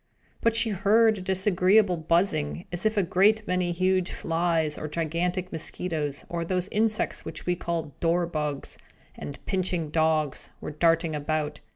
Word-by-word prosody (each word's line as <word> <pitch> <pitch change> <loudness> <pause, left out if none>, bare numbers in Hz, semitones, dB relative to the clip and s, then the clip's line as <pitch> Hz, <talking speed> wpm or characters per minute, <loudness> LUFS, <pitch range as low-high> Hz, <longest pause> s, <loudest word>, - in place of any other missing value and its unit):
But 230 0 +2
she 230 -1 +3
heard 215 +2 +3
a - - -7
disagreeable 190 +1 +3
buzzing, 160 - 0
as 175 +4 0
if 215 0 -2
a 200 - +4
great 205 +5 +3
many 180 -1 0
huge 185 +1 +1
flies, 165 -2 0
or 155 - -5
gigantic 170 +4 -2
mosquitoes, 155 -3 -2
or 170 -1 -3
those 180 +1 -1
insects 215 0 0
which 155 - -7
we 180 - +1
call 165 -4 -3
dor 170 +1 +2
bugs, 150 -4 -3 0.3
and 140 - -8
pinching 180 -5 -1
dogs, 155 -3 0
were - - -6
darting 165 +1 +2
about. 150 0 -2
175 Hz, 155 wpm, -26 LUFS, 155-185 Hz, 0.3 s, a